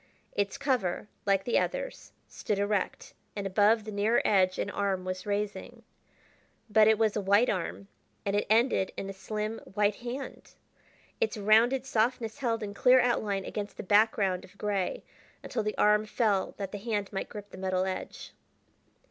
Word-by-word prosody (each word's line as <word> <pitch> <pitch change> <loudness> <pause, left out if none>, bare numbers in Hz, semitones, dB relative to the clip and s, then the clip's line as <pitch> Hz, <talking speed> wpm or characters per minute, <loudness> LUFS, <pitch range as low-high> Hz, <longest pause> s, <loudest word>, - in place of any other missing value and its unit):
Its 200 +5 -1
cover, 250 -10 -1 0.2
like 195 -1 +3
the 240 - +2
others, - - -4 0.2
stood 210 - -3
erect, 200 -1 -1 0.2
and 200 -1 -4
above 210 +3 +3
the 215 - -7
nearer 210 +3 +2
edge 185 -2 +3
an - - -1
arm 195 -3 -1
was 185 +2 -5
raising. 205 0 -3 0.9
But 215 0 +6
it 220 -1 +5
was 220 -1 +2
a 210 - 0
white 200 +5 +4
arm, 190 +1 -4 0.4
and 200 0 0
it 205 - 0
ended 225 -3 +3
in 195 - -4
a - - -9
slim, 215 +3 -4
white 205 +2 0
hand! 245 +3 -7 0.7
its 460 - 0
rounded 225 +5 +4
softness 230 0 0
held 230 -4 -1
in 205 -1 -5
clear 250 +5 +5
outline 210 -6 0
against 205 -1 -5
the - - -5
back 210 +3 +4
ground 190 -3 0
of 200 - -16
gray, 200 -3 -2 0.4
until 235 - -2
the 215 0 -3
arm 210 +1 +4
fell 210 -4 0
that 195 -2 -5
the 205 - -5
hand 205 -2 -3
might 195 - -3
grip 205 -1 -9
the - - -10
metal 185 -1 0
edge. 190 -1 -6
210 Hz, 175 wpm, -29 LUFS, 195-225 Hz, 0.9 s, But